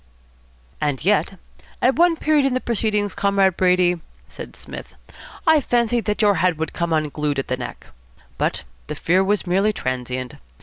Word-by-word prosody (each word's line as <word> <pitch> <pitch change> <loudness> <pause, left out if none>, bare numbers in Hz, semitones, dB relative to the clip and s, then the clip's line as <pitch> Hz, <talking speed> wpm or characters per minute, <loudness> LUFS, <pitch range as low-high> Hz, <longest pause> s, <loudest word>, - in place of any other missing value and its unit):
"And 145 0 -1
yet 195 -1 +2 0.4
at 260 +2 +3
one 340 0 +4
period 305 -2 +2
in 270 -2 +1
the - - +1
proceedings, 210 -4 0
Comrade 200 -2 +2
Brady," 180 -2 +2 0.3
said - - -10
Psmith, - - -10 0.5
"I 320 -2 +5
fancied 240 -2 +1
that 210 +1 0
your 205 -2 +4
head 180 -3 +2
would 160 +1 -3
come 170 -1 -2
unglued 150 -2 -1
at 135 - -3
the 130 - +1
neck. 125 - -7 0.5
But - - -1 0.2
the - - -4
fear 185 +3 +2
was 205 +1 0
merely 195 +4 +2
transient. 130 - -4
190 Hz, 165 wpm, -21 LUFS, 160-220 Hz, 0.5 s, I